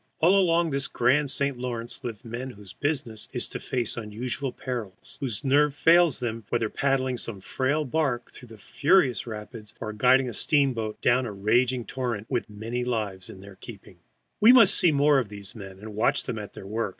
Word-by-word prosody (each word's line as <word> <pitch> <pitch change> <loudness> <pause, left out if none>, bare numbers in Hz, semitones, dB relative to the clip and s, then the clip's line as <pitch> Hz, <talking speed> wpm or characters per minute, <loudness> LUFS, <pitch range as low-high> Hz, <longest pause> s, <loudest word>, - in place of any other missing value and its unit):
All 175 +5 +4
along 170 -4 +3
this 140 -1 -1
grand 135 +4 +2
St. 140 -1 -1
Lawrence 120 -2 -5
live 115 -3 -6
men 120 +3 -5
whose 100 -6 -12
business 130 -7 -3
it - - -6
is - - -3
to - - -5
face 120 -3 -3
unusual 120 +5 -4
perils, 120 -9 -7
whose 130 -4 -3
nerve 145 +1 +3
fails 165 -2 +4
them 120 -3 -3
not, 110 -3 -17
whether 115 -2 0
paddling 130 -2 0
some 110 -4 -4
frail 140 +9 -1
bark 130 -4 -1
through 115 -3 -12
furious 135 - +2
rapids 105 0 -9
or 110 - -5
guiding 130 +4 +4
a 120 - -5
steamboat 125 -8 0
down 125 +1 +2
a - - -5
raging 120 +5 +1
torrent, 120 -5 -4
with 120 -4 -1
many 115 +4 -4
lives 105 -6 -3
in 95 - -11
their 100 -1 -13
keeping. 100 -5 -12 0.4
We 220 +3 +8
must 235 -6 +8
see 175 - +5
more 145 -1 +4
of 120 -6 -3
these 100 -2 -7
men, 95 -3 -10
and 105 +2 -10
watch 120 +7 +1
them 115 -4 -4
at 105 - -8
their - - -10
work. 110 +2 -2
120 Hz, 200 wpm, -26 LUFS, 110-140 Hz, 0.4 s, We